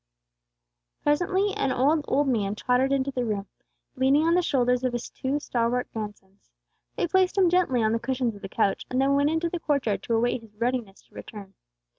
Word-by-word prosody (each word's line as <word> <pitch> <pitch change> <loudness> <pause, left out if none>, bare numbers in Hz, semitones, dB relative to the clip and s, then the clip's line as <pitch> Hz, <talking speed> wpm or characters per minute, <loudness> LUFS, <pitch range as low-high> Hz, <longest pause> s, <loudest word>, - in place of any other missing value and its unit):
Presently 375 +7 +1
an 270 - 0
old, 285 +4 +2
old 285 +1 +2
man 210 -5 0
tottered 250 +4 +1
into 275 0 +1
the 250 -2 -2
room, 210 -4 -2 0.5
leaning 270 +3 +3
on 335 - +3
the 360 - +4
shoulders 250 -5 +1
of 255 -1 0
his 240 0 -4
two 270 +3 -2
stalwart 245 -2 -1
grandsons. 205 -3 -8 0.5
They - - 0
placed 375 +2 +2
him 370 -3 +4
gently 310 -10 +2
on 220 - +2
the 230 - 0
cushions 255 -2 -1
of 200 - -13
the 195 - -7
couch, 195 - 0
and 255 - -1
then 270 +1 +3
went 285 +1 +3
into 320 +2 0
the 345 +1 -4
court 290 -4 0
yard 210 -3 0
to 230 - -1
await 240 +1 +1
his 220 -2 -18
readiness 235 -3 -3
to - - -31
return. 200 -3 -10
255 Hz, 205 wpm, -26 LUFS, 225-290 Hz, 0.5 s, the